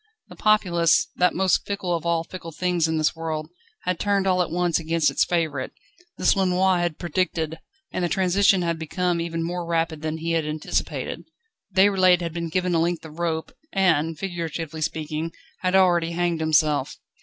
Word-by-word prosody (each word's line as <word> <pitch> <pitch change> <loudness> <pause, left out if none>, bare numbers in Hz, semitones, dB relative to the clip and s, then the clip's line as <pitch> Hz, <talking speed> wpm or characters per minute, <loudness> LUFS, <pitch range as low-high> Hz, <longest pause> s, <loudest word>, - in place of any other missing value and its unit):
The - - -11
populace, 175 -6 +3
that 180 0 +3
most 190 -1 +2
fickle 195 -4 -1
of 170 0 -4
all 165 -1 +1
fickle 165 -1 -9
things 175 0 0
in 160 0 -1
this 155 +1 +1
world, 160 -1 -4 0.3
had 180 -2 -1
turned 200 -1 +1
all 185 -1 +3
at 180 - -1
once 175 0 +1
against 165 0 +1
its - - +2
favourite. 155 -6 -1 0.5
This - - +3
Lenoir 185 -1 +2
had 175 -2 -1
predicted, 170 -3 -2 0.3
and 185 - -2
the 175 - +1
transition 190 0 +3
had 170 -1 -1
been 175 +2 -1
even 165 0 -3
more 175 +1 -3
rapid 165 -2 -1
than 155 0 -3
he 165 +1 -3
had 165 -1 +1
anticipated. 155 0 -3 0.5
Déroulède 190 -2 +5
had 170 -2 -4
been 170 -1 -3
given 180 +1 0
a 165 - +3
length 170 0 -1
of 160 +1 -11
rope, 160 -2 -2 0.2
and, 165 -5 +2
figuratively 165 -4 -4
speaking, 155 +1 -3 0.3
had 185 0 0
already 175 -3 +3
hanged 175 -1 0
himself. 155 -3 +2
170 Hz, 180 wpm, -24 LUFS, 160-180 Hz, 0.5 s, Déroulède